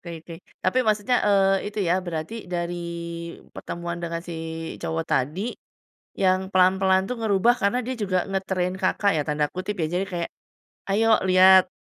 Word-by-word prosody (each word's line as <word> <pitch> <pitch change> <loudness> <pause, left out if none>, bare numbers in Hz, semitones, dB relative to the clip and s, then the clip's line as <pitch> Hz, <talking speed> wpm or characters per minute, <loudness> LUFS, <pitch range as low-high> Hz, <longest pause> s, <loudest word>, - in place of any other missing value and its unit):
Oke 170 -2 -8
oke, 170 - -9 0.3
tapi 185 +7 +2
maksudnya, 215 +3 +2
eee, 195 -1 +3
itu 210 - -7
ya, 180 +2 +2
berarti 170 +2 -5
dari 175 0 -2 0.8
pertemuan 170 0 -5
dengan 170 0 -3
si 175 -2 -7 0.5
cowok 160 0 -2
tadi, 170 - -1 0.6
yang 190 0 +2
pelan-pelan 190 +1 +4
tuh 250 - -3
ngerubah 220 +2 +3
karena 200 +5 +2
dia 255 - -3
juga 185 -4 0
"nge-train" 190 -2 -2
Kakak 200 +2 +2
ya 150 - +1
tanda 150 0 +1
kutip 185 +3 -4
ya, 155 - +2
jadi 180 +2 0
kayak, 175 -3 -3 0.6
"Ayo 220 +2 +4
lihat 185 0 +7
185 Hz, 155 wpm, -24 LUFS, 175-200 Hz, 0.8 s, lihat